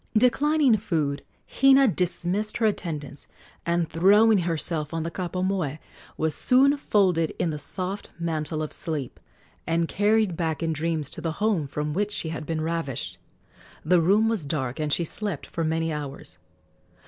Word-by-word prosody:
Declining 275 +1 +4
food, 155 -9 -2 0.2
Hina 270 0 +5
dismissed 185 +2 -1
her 230 - +1
attendants, 155 -8 -3 0.4
and, 170 -1 +1
throwing 205 +6 +5
herself 165 -2 -2
on 165 - -1
the 165 - -4
kapa 180 +1 -3
moe, 185 -7 -1 0.4
was 160 -1 0
soon 275 +3 +4
folded 185 - +1
in 165 - 0
the 150 - -5
soft 185 +6 -4
mantle 155 -2 -2
of 155 - -2
sleep 150 -6 -4 0.5
and 165 0 +1
carried 210 -1 +2
back 160 -1 -2
in 160 -1 0
dreams 155 -2 -2
to - - -7
the 165 -2 -2
home 200 -6 0
from 150 +2 -3
which 205 +4 -1
she 165 - -3
had 160 -1 -5
been 160 -1 -2
ravished. 160 -5 -3 0.7
The 175 +1 +4
room 205 +6 +4
was 215 -10 -1
dark, 135 -4 -3
and 150 -1 -1
she 170 - +2
slept 195 -1 -3
for 165 - -4
many 160 0 0
hours. 145 -2 -7
170 Hz, 160 wpm, -25 LUFS, 155-205 Hz, 0.7 s, Hina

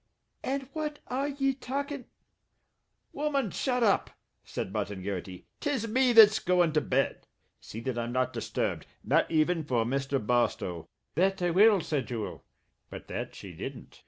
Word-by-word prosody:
"And 270 0 -2
what 300 -1 -3
are 270 +3 0
ye 275 -1 0
talkin' 280 +1 -4 0.6
" - - -49
"Woman, 280 -8 0
shut 250 -2 0
up," 205 -3 +3 0.3
said - - -5
Martin 95 -1 -3
Garrity. 95 -2 -5
"'Tis 270 -7 -1
me 255 +2 +3
that's 220 -2 +8
goin' 175 -3 +2
to 150 - +3
bed. 135 0 0 0.3
See 110 - -8
that 120 0 -2
I'm 120 0 -3
not 130 +1 0
disturbed. - - -2 0.2
Not - - +2
even 160 +1 +2
for 125 -6 +1
Mr. 135 +2 0
Barstow." 105 -8 0 0.2
"That 190 +4 +2
I 175 - +2
will," 200 +2 +6
said 150 -4 -2
Jewel 115 -4 -5 0.5
but - - -9
that - - -4
she - - -9
didn't. - - -8
180 Hz, 160 wpm, -29 LUFS, -, 0.6 s, that's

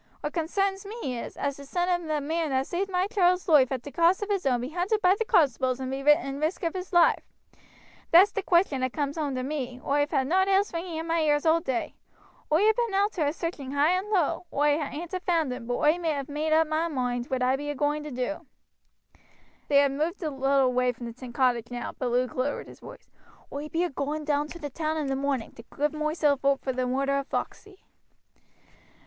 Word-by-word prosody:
What 295 - -4
consarns 385 +4 -1
me 395 - -5
is, - - -8
as 280 -1 -2
the 280 - -10
son 350 +4 -1
of 350 -2 0
the 305 -1 0
man 320 +1 -1
as 265 0 0
saved 385 +3 -2
my 365 0 +1
child's 365 -4 +2
loife 285 -6 +5
at 255 -2 -3
t' 285 - -8
cost 340 +7 +3
of 410 - -4
his 390 -7 0
own 245 -2 +2
be 250 - -4
hunted 360 +6 0
by 370 -2 +4
the 405 - -1
constables 260 - +2
and 260 0 -4
be 270 - -3
in 275 -1 +2
risk 315 +5 -2
of 330 - 0
his 370 -1 -5
loife. 345 -2 +4 0.9
That's 365 +5 +7
t' 405 - -2
question 345 -7 +2
as 255 0 0
comes 285 -2 -2
home 295 -4 -2
to 255 - -2
me 260 -3 -4
oi've 290 +1 +1
had 270 -3 +1
nowt 375 +6 +2
else 390 0 +2
ringing 335 -1 -4
in 325 - -4
my 335 0 0
ears 295 -1 +2
all 325 +1 +4
day. 265 -8 -3 0.6
Oi 315 +6 +4
ha' 435 0 +4
been 470 -5 -1
oot 405 +2 +2
to 310 -7 -1
a - - +1
searching 305 -5 -5
high 290 +3 +3
and 370 +3 -1
low. 360 -3 0
Oi 295 +1 +2
ain't 305 +4 -2
a 370 - -1
found 330 -7 0
him, 235 -2 -8
but 245 - -1
oi 300 - +4
ha 300 -4 0
made 300 +2 -2
oop 320 0 +4
moi 315 +2 0
moind 245 -4 -2
whaat 260 -1 -1
I 255 +1 +3
be 290 +2 -5
agoing 290 +1 0
to 300 - -6
do." 280 +5 -4 1.2
They 285 - +3
had 280 -1 +5
moved 320 +7 -2
a 310 - -2
little 270 0 +2
away 250 0 +1
from 235 0 -7
the 250 +1 -10
cottage 240 -2 +1
now, 245 -1 -5
but 255 - -1
Luke 250 +1 0
lowered 260 +3 -2
his - - -13
voice: - - -13 0.4
"Oi 290 +2 -5
be 330 +3 0
agoing 295 +1 -4
down 295 0 0
to 340 - -9
t' 295 - -4
town 315 +2 -2
in 305 - -1
the 270 -1 -1
morning 270 -4 -2
to 230 - -13
give 295 +1 +1
moiself 305 -2 0
oop 275 0 +2
vor 260 - 0
the 255 0 -1
murder 275 +2 0
of 275 - -6
Foxey." 395 -2 -5
295 Hz, 235 wpm, -27 LUFS, 270-345 Hz, 1.2 s, That's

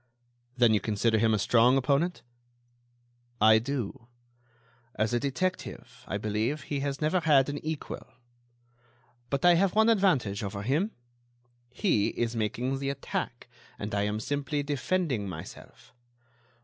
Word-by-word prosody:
"Then 120 -3 +5
you 105 - +3
consider 110 +2 +1
him 110 0 +3
a 110 - +3
strong 120 +5 +4
opponent?" 140 +6 0 1.2
"I 110 +1 +6
do. 125 -1 -4 0.9
As 110 +2 0
a 120 - +2
detective, 130 -3 -4
I 100 - -2
believe, 110 +8 -1
he 145 +1 -3
has 140 +1 -3
never 155 +5 +2
had 145 -5 +4
an 145 0 -5
equal. 155 -1 -5 1.2
But 140 +3 -1
I 175 - +8
have 185 +2 +2
one 220 +1 +5
advantage 170 - +2
over 100 -1 -4
him; 150 - +1 0.8
he 125 - +1
is 120 0 -2
making 120 +5 -1
the 135 0 -2
attack 135 -3 -4 0.3
and 105 0 -5
I 100 - +1
am 105 +1 -2
simply 145 +4 -2
defending 145 - -1
myself. 80 +7 -11
130 Hz, 135 wpm, -28 LUFS, 110-150 Hz, 1.2 s, I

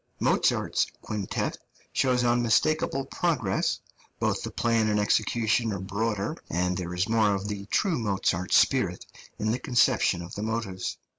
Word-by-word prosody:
Mozart's - - +2 0.2
quintet 105 -3 -3 0.3
shows 125 -2 +2
unmistakable 120 +4 +2
progress; 135 - 0 0.4
both - - 0
the - - -4
plan 115 -2 +1
and 105 0 +2
execution 110 +2 +1
are 100 - -2
broader, 100 +2 -2
and 90 +2 0
there 90 -1 -4
is 90 +2 0
more 110 -2 +3
of 100 +1 -4
the 100 -1 -5
true 180 - +1
Mozart 95 -4 -1
spirit - - +3 0.3
in 110 +1 0
the 125 - -1
conception 120 -8 +2
of 85 - -10
the 105 - -5
motives. 110 -4 -3
110 Hz, 145 wpm, -27 LUFS, 95-120 Hz, 0.4 s, more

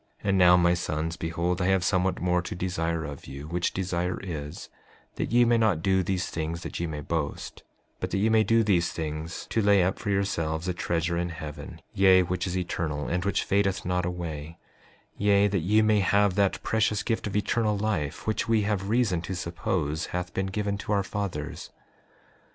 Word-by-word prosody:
5:8 100 - -1
And 95 - +3
now 90 0 +7
my 85 0 +4
sons, 80 -1 -2
behold 85 +2 -2
I 90 - +1
have 95 -2 +3
somewhat 95 0 +1
more 90 0 +1
to 90 - -6
desire 85 -3 -2
of 70 -1 -8
you, 70 +2 -8
which 85 +2 -1
desire 90 -1 -2
is, 75 -5 -6 0.5
that - - -2
ye 120 +1 +5
may 120 0 +3
not 105 -8 +2
do 95 -1 +3
these 95 0 -1
things 80 +1 -3
that - - -5
ye 85 - -1
may 75 -2 -5
boast, 80 -1 -4 0.4
but - - -3
that 95 - -1
ye 100 +3 +2
may 110 -1 +4
do 115 +2 +3
these 90 -5 +2
things 80 0 -5
to 115 - +2
lay 100 -2 +5
up 95 +2 0
for - - -4
yourselves 85 -4 -1
a 90 - 0
treasure 85 0 -1
in 85 0 -1
heaven, 80 -3 -8
yea, 95 -1 +6
which 90 +1 -2
is 90 +1 -2
eternal, 80 -4 -2
and 90 0 -1
which 100 - +1
fadeth 100 -1 +1
not 90 0 0
away; 85 -3 -5 0.6
yea, 100 0 +4
that 100 -1 0
ye 105 +6 +3
may 110 -1 +4
have 100 0 +3
that 100 0 +1
precious 110 -1 +1
gift 115 -2 -1
of 100 - -5
eternal 105 0 +1
life, 100 -9 -2
which 110 +1 -1
we 110 -2 +3
have 100 -1 -1
reason 110 -7 +2
to 95 +2 -5
suppose 85 -2 -2
hath 90 0 -4
been 95 0 -1
given 100 0 -2
to 105 - -5
our 100 -1 +2
fathers. 95 -7 -4
90 Hz, 200 wpm, -27 LUFS, 85-100 Hz, 0.6 s, now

